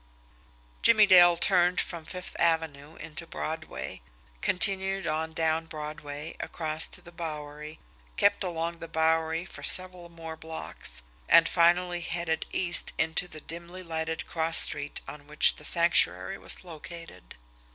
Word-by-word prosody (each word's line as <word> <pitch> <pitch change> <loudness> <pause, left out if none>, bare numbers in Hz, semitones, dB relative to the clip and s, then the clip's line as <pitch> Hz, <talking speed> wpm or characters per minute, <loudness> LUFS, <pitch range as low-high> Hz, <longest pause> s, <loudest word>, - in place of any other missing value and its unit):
Jimmie 220 -2 +6
Dale 175 -3 +7
turned 180 0 +3
from 170 -2 -4
Fifth 180 +2 -7
Avenue 160 -2 0
into 165 +1 -8
Broadway, 160 - -6 0.4
continued 195 0 +2
on 160 0 -2
down 160 0 -1
Broadway, 150 0 -7
across 155 -1 -1
to - - -8
the 175 - -12
Bowery, 150 -2 -7 0.4
kept - - +2
along 170 -1 -3
the 165 - -7
Bowery 160 +1 0
for - - -10
several 180 -2 -1
more 165 -1 -9
blocks 160 - -6 0.3
and 165 +1 +7
finally 175 +1 +2
headed 170 -1 -3
east 175 -2 +3
into 160 +2 0
the 155 -3 -10
dimly 170 +4 -8
lighted 160 -1 -4
cross 165 0 +4
street 145 0 +3
on 145 -1 -10
which 150 0 +4
the - - -10
Sanctuary 130 - +2
was 95 - +1
located. 165 - -11
165 Hz, 135 wpm, -28 LUFS, 155-175 Hz, 0.4 s, Dale